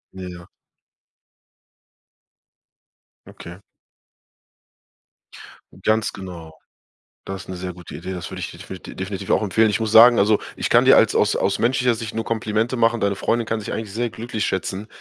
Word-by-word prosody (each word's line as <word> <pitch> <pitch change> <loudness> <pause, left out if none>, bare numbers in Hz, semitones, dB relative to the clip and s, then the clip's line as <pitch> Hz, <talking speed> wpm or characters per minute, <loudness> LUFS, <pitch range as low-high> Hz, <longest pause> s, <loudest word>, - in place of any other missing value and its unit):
Ja, 95 -1 -7
ja. 85 -1 -11 2.8
Okay. 85 +1 -11 2.2
Ganz 110 +1 +1
genau. 85 -4 -10 0.7
Das 95 0 -6
'ne 95 - -6
sehr 90 0 -5
gute 90 -1 -11
Idee. 90 +4 -6
Das 90 -2 -6
würde - - -7
ich - - -5
definiti 95 - -10
definitiv 95 0 -4
auch - - +3
empfehlen. 110 +2 +2
Ich 115 - -1
muss 110 -1 -2
sagen, 115 +1 +8
also, 105 +1 +3 0.2
ich - - -2
kann - - +5
dir - - +8
als - - +4
aus - - +3
aus - - 0
menschlicher 125 0 +2
Sicht 110 -1 -6
nur 115 0 -2
Komplimente 110 +2 -1
machen. 115 0 +2
Deine 100 0 +1
Freundin 115 +3 -1
kann 115 0 -1
sich 105 - -6
eigentlich 110 -3 -5
sehr 115 +2 -2
glücklich 110 -2 -4
schätzen, 95 +2 -3
105 Hz, 160 wpm, -22 LUFS, 95-115 Hz, 2.8 s, sagen